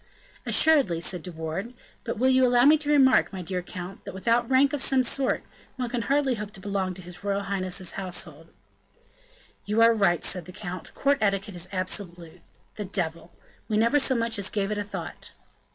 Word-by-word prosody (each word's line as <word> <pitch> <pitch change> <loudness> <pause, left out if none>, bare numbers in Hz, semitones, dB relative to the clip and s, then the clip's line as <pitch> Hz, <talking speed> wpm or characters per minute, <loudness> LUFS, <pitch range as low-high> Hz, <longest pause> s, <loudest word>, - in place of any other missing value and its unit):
"Assuredly," 280 - +4
said 175 +1 -2
De 180 - -7
Wardes; 165 +8 -5 0.3
"but 235 - -4
will 255 +4 +2
you 260 0 +4
allow 245 0 +5
me 300 +2 +8
to 300 -1 -3
remark, 275 -3 +5
my 190 -2 -6
dear 180 +1 -3
count, 180 +2 -8
that, - - -8
without 230 +4 +1
rank 270 +2 +4
of 290 - -1
some 265 -1 +3
sort, 265 +2 0 0.3
one 250 -2 -3
can 240 0 -2
hardly 275 +1 +1
hope 210 -3 -5
to 195 - -11
belong 190 -2 -2
to 185 - -10
his 180 +2 -9
royal 200 0 -1
highness's 185 -2 -3
household?" 175 -4 -5 1.2
"You 210 +2 -1
are 230 0 +7
right," 195 -6 +2
said 180 -3 -2
the 180 - -10
count, 180 -3 -7
"court 280 0 +2
etiquette 200 0 0
is 175 -1 -4
absolute. 180 -3 -4 0.4
The 210 - -4
devil! 170 -3 -3 0.4
we 215 - 0
never 235 +7 +4
so 265 -1 +2
much 230 -2 -1
as 200 - -2
gave 200 -1 -1
it 210 - -1
a - - -1
thought." 205 - -7
200 Hz, 200 wpm, -26 LUFS, 180-245 Hz, 1.2 s, me